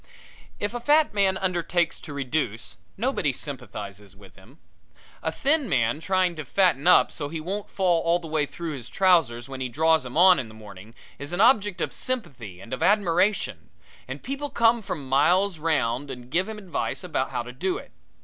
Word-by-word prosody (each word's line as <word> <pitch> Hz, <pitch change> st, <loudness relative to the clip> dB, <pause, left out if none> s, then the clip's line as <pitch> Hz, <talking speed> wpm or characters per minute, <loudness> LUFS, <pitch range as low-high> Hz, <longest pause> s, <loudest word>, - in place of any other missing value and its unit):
If 205 Hz, +2 st, -2 dB
a 240 Hz, -, -3 dB
fat 295 Hz, +3 st, +3 dB
man 195 Hz, -2 st, +2 dB
undertakes 175 Hz, -2 st, 0 dB
to 155 Hz, -, -8 dB
reduce 135 Hz, -5 st, -3 dB, 0.2 s
nobody 220 Hz, -, 0 dB
sympathizes 105 Hz, -7 st, -7 dB
with 95 Hz, -3 st, -17 dB
him. 95 Hz, -1 st, -18 dB, 0.6 s
A 160 Hz, -, -1 dB
thin 280 Hz, -, 0 dB
man 120 Hz, +3 st, +1 dB
trying 185 Hz, 0 st, +1 dB
to 155 Hz, -, -4 dB
fatten 175 Hz, -1 st, +2 dB
up 180 Hz, -, +6 dB
so 145 Hz, -2 st, -5 dB
he 160 Hz, +1 st, -5 dB
won't 195 Hz, +6 st, -4 dB
fall 180 Hz, -4 st, +1 dB
all 170 Hz, +1 st, +2 dB
the 170 Hz, -2 st, -9 dB
way 155 Hz, -2 st, 0 dB
through 170 Hz, +1 st, -6 dB
his 130 Hz, -5 st, -7 dB
trousers 165 Hz, -11 st, +2 dB
when 135 Hz, -1 st, -7 dB
he 130 Hz, -, -2 dB
draws 160 Hz, +4 st, +2 dB
'em 130 Hz, +3 st, -6 dB
on 180 Hz, -1 st, +7 dB
in 125 Hz, -, -4 dB
the 110 Hz, -, -14 dB
morning 105 Hz, +1 st, -13 dB, 0.2 s
is 145 Hz, +4 st, -6 dB
an 175 Hz, -, -2 dB
object 205 Hz, -6 st, +4 dB
of -, -, -2 dB
sympathy 125 Hz, -, -5 dB
and 115 Hz, +6 st, -9 dB
of 130 Hz, -, -4 dB
admiration, 195 Hz, +1 st, +1 dB, 0.4 s
and -, -, -7 dB
people 280 Hz, +2 st, -4 dB
come 230 Hz, -1 st, +3 dB
from 150 Hz, -9 st, -6 dB
miles 170 Hz, +7 st, +3 dB
round 145 Hz, -4 st, 0 dB
and 125 Hz, -1 st, -9 dB
give 185 Hz, +6 st, +1 dB
him 220 Hz, -, -6 dB
advice 195 Hz, -4 st, -3 dB
about -, -, -2 dB
how -, -, -3 dB
to -, -, -9 dB
do 380 Hz, 0 st, -2 dB
it. -, -, -11 dB
165 Hz, 195 wpm, -25 LUFS, 130-195 Hz, 0.6 s, on